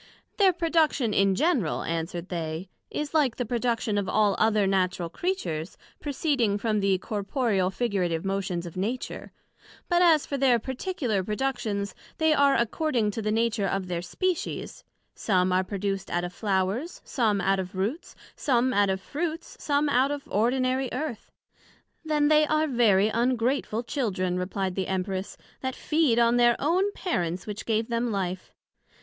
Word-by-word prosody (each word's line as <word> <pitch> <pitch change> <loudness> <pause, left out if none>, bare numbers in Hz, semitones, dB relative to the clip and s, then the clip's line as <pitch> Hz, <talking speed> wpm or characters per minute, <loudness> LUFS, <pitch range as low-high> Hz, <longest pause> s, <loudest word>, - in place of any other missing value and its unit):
Their 390 -3 +6
production 320 - +1
in 195 -1 +3
general, 260 - +1
answered 165 +2 -3
they, 165 0 -4 0.2
is 300 0 -4
like 285 -7 +3
the 245 - -2
production 230 -2 0
of 195 - -3
all 210 -2 +3
other 215 -2 +3
Natural 185 -2 0
Creatures, 170 - -3 0.2
proceeding 270 -7 0
from 215 0 0
the 195 -1 +2
corporeal 205 -1 -1
figurative 190 -6 -1
motions 190 -3 -2
of 170 - -8
Nature; 220 +7 -4 0.6
but 350 0 +3
as 325 -4 +5
for 280 - -3
their 255 -3 +4
particular 250 - -2
productions, 210 -2 -2 0.2
they 315 -1 +3
are 280 -2 +4
according 235 -2 +1
to 225 - -4
the 215 0 -1
nature 225 -2 +1
of 195 -1 -1
their 175 -1 -2
Species; 365 - -3 0.3
some 185 -3 +1
are 185 +1 +3
produced 195 0 -3
out 175 0 -1
of 175 0 -5
flowers, 200 - -1
some 220 -6 +1
out 195 +1 +2
of 185 0 -5
roots, 215 - -3 0.2
some 255 -1 +1
out 205 -2 +3
of 190 0 0
fruits, 320 - -4
some 290 0 +1
out 265 -1 +3
of 290 -1 -3
ordinary 255 +4 +1
Earth. 255 -3 -4 0.7
Then 300 -2 +2
they 305 0 +5
are 310 +1 +2
very 220 -7 +3
ungrateful 240 0 0
Children, 185 -9 -1
replied 190 +1 -2
the 190 0 -2
Empress, 190 0 -3 0.2
that 260 -1 -3
they - - -15
feed 305 -7 +2
on 235 0 +4
their 240 -1 +5
own 365 +8 +1
Parents 180 - -2
which 210 -1 -6
gave 220 0 +1
them 235 0 0
life. 185 -2 -3
225 Hz, 160 wpm, -27 LUFS, 190-275 Hz, 0.7 s, Their